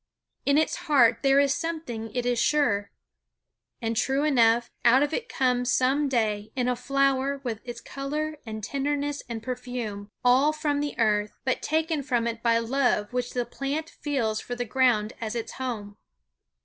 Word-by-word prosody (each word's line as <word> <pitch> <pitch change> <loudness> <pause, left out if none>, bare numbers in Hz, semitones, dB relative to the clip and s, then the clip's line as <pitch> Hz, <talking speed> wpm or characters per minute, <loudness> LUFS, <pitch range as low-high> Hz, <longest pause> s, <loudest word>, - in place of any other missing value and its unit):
In 280 +1 +4
its 315 - +1
heart 245 -6 +5
there 275 0 +4
is 280 -1 +3
something 300 -10 -4
it 245 -1 -1
is 245 -1 +1
sure. 205 -10 +2 0.9
And 225 0 -1
true 270 +5 +1
enough, 240 -5 +3
out 255 +4 +6
it 470 +4 -3
comes 250 - +1
some 270 +3 +2
day 215 -4 0
in 250 -1 0
a 250 - +1
flower 275 +1 +1
with 230 -4 -4
its 240 -1 -7
color 300 +4 -4
and 220 -2 -7
tenderness 285 +3 -2
and 225 -2 -5
perfume; 245 -5 -5 0.2
all 265 +5 +5
from 300 -2 -1
the 290 0 -3
earth, 210 -2 +1
but 260 - 0
taken 315 0 0
from 245 -4 0
it 230 -1 -3
by 230 -1 +3
love 235 -2 0
which 250 0 -2
the 245 -1 -1
plant 295 +6 -4
feels 230 -7 -1
for 245 - -5
the 245 0 -3
ground 230 -3 +2
as 225 0 -3
its 230 - -4
home. 215 -6 -5
250 Hz, 170 wpm, -26 LUFS, 230-280 Hz, 0.9 s, out